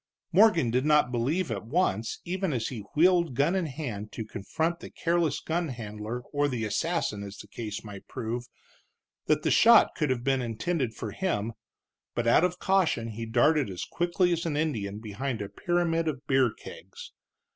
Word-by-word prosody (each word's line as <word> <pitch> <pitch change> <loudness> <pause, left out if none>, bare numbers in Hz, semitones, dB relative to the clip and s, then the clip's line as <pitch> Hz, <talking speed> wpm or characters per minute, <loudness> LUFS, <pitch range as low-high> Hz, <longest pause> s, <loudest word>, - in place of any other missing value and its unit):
Morgan 175 - +5
did 125 +2 +1
not 150 -4 +4
believe 130 +7 0
at 100 -2 -3
once, 115 - 0
even 185 -2 -1
as 115 -3 -1
he 125 - -6 0.2
wheeled 170 -3 +4
gun 145 +7 +2
in 185 -4 0
hand 120 -8 -5
to 110 - -5
confront 160 - -2
the - - -9
careless 170 -3 0
gun 170 +1 -1
handler 110 -1 -5
or 145 0 +2
the 120 -5 -2
assassin, 105 0 -1
as 100 0 -8
the - - -10
case 105 0 -6
might 100 -3 -10
prove, 120 +2 -4 0.8
that - - +2
the - - +2
shot 230 -1 +7
could 150 -3 0
have 125 -2 -1
been 135 0 +1
intended 120 +2 -2
for 110 - -5
him, 115 - -2 0.6
but 120 - -1
out 115 +7 +5
of 180 0 +1
caution 180 - +1
he 115 +1 -6
darted 135 +3 +3
as 90 -2 -5
quick 175 +1 -3
as 175 -2 +3
an 160 -4 -1
Indian 110 -11 -1
behind 115 +4 -4
a 100 - -4
pyramid 170 - 0
of 140 -2 -3
beer 130 -3 +3
kegs. - - -11
130 Hz, 180 wpm, -28 LUFS, 110-170 Hz, 0.8 s, shot